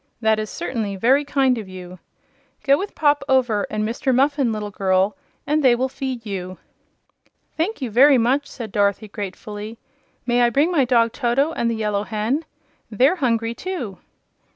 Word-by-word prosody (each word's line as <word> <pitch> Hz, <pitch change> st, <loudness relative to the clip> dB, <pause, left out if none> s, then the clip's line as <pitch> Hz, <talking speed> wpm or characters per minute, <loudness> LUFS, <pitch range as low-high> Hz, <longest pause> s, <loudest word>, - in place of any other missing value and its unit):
"That 220 Hz, -1 st, +2 dB
is 215 Hz, -1 st, -4 dB
certainly 225 Hz, -, -3 dB
very 255 Hz, +9 st, +3 dB
kind 270 Hz, -4 st, +1 dB
of 205 Hz, -4 st, -8 dB
you. 185 Hz, -1 st, -10 dB, 0.6 s
Go 275 Hz, 0 st, +5 dB
with 390 Hz, +7 st, -5 dB
Pop 290 Hz, -2 st, +2 dB
Over 245 Hz, -6 st, +2 dB
and 215 Hz, 0 st, -2 dB
Mr. 255 Hz, +4 st, -1 dB
Muffin, 275 Hz, -2 st, +2 dB
little 210 Hz, -1 st, -4 dB
girl, 190 Hz, +2 st, +1 dB, 0.3 s
and 300 Hz, +2 st, +1 dB
they 250 Hz, -2 st, +6 dB
will 260 Hz, +2 st, -1 dB
feed 260 Hz, -3 st, -5 dB
you." 185 Hz, -3 st, -5 dB, 1.0 s
"Thank 330 Hz, -1 st, -2 dB
you 240 Hz, -, -3 dB
very 270 Hz, +5 st, +6 dB
much," 260 Hz, +5 st, +1 dB
said 230 Hz, -5 st, -8 dB
Dorothy, 200 Hz, +1 st, +1 dB
gratefully. 210 Hz, +2 st, -7 dB, 0.5 s
"May 245 Hz, 0 st, +2 dB
I 240 Hz, -, +4 dB
bring 285 Hz, +8 st, +2 dB
my 290 Hz, -7 st, +3 dB
dog 235 Hz, -2 st, +3 dB
Toto, 270 Hz, +5 st, 0 dB
and 235 Hz, -7 st, -1 dB
the 230 Hz, -, -1 dB
Yellow 210 Hz, -2 st, -1 dB
Hen? 225 Hz, +9 st, -2 dB, 0.4 s
They're 260 Hz, -, +3 dB
hungry, 230 Hz, -5 st, 0 dB
too." 245 Hz, -, -5 dB
235 Hz, 170 wpm, -21 LUFS, 210-275 Hz, 1.0 s, they